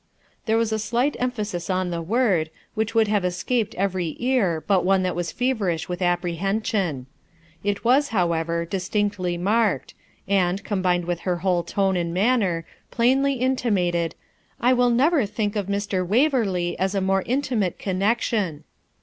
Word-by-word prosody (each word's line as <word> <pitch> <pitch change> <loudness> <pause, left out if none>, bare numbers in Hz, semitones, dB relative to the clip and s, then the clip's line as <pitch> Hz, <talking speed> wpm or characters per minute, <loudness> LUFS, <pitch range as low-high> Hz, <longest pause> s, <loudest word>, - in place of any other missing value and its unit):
There 220 +1 +3
was 230 -1 +1
a 220 - 0
slight 240 +6 0
emphasis 210 -8 -3
on 185 -1 0
the 170 -1 -2
word, 190 -4 +1 0.2
which 220 +1 -2
would 225 -1 +4
have 205 -2 +1
escaped 185 +6 -1
every 185 -4 -1
ear 225 -11 +1
but 195 -3 +2
one 190 0 +3
that 185 - -1
was 170 -2 -2
feverish 215 -10 -1
with 180 +1 -5
apprehension. 180 - -1 0.6
It 205 +2 -2
was, 270 +4 +4
however, 170 -5 0
distinctly 190 0 -1
marked, 210 +3 +1 0.3
and, 190 -1 +1
combined 180 -3 0
with 175 -1 -2
her 180 0 -1
whole 180 -2 +3
tone 190 +2 0
and 170 -1 -2
manner, 195 -6 +1 0.2
plainly 265 +4 +2
intimated, 200 -10 0 0.4
'I 250 +2 +4
will 245 -1 +3
never 265 +1 +3
think 210 0 -2
of 205 -3 -2
Mr. 200 -2 -1
Waverley 205 - +1
as 190 +2 0
a - - +2
more 195 0 +2
intimate 245 -8 0
connexion.' 195 -4 -1
195 Hz, 150 wpm, -23 LUFS, 175-230 Hz, 0.6 s, would